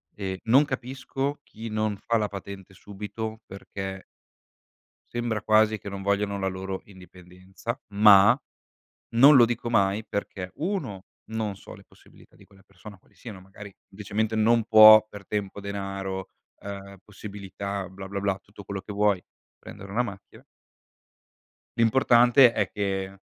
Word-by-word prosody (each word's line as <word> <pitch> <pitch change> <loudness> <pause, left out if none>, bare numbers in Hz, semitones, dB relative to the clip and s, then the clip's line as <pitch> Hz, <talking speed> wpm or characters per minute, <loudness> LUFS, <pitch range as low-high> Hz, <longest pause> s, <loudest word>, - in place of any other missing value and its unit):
ehm, 95 -2 -4
non 130 +6 +5
capisco 135 +2 -4
chi 115 +1 -9
non 110 -1 -1
fa 115 +3 0
la 105 -1 0
patente 100 -1 -9
subito, 105 +3 -7
perché 95 0 -8 1.1
sembra 120 -3 -2
quasi 110 0 +3
che 100 - -8
non 100 0 -7
vogliano 100 0 0
la 95 - -3
loro 95 0 -5
indipendenza. 95 +4 -9
Ma 100 -1 +7 0.7
non 135 +6 +7
lo 120 - +8
dico 120 0 -3
mai 100 -1 +1
perché: 100 -3 -5
1, 145 - -4 0.3
non 110 -2 -3
so 95 - -13
le - - -17
possibilità - - -22
di - - -19
quella 95 -1 -23
persona 100 +1 -14
quali - - -30
siano, 105 -6 -10
magari 100 +2 -12
semplicemente 105 +2 -3
non 115 +1 +3
può 110 -1 +9
per 105 -2 -11
tempo, 100 -1 -4
denaro, 95 -1 -5 0.3
ehm, 100 -1 -9
possibilità, 100 -1 -7
bla, 95 +1 -10
bla, 100 0 -4
bla, 100 -1 -1
tutto 105 0 -14
quello 100 0 -5
che 105 +2 -9
vuoi 100 -2 +1 0.4
prendere 100 0 -11
una 120 +4 +1
macchina 100 -4 -10 1.3
L'importante 120 +1 +5
è 100 - 0
che 95 -1 -3
100 Hz, 145 wpm, -26 LUFS, 95-110 Hz, 1.3 s, può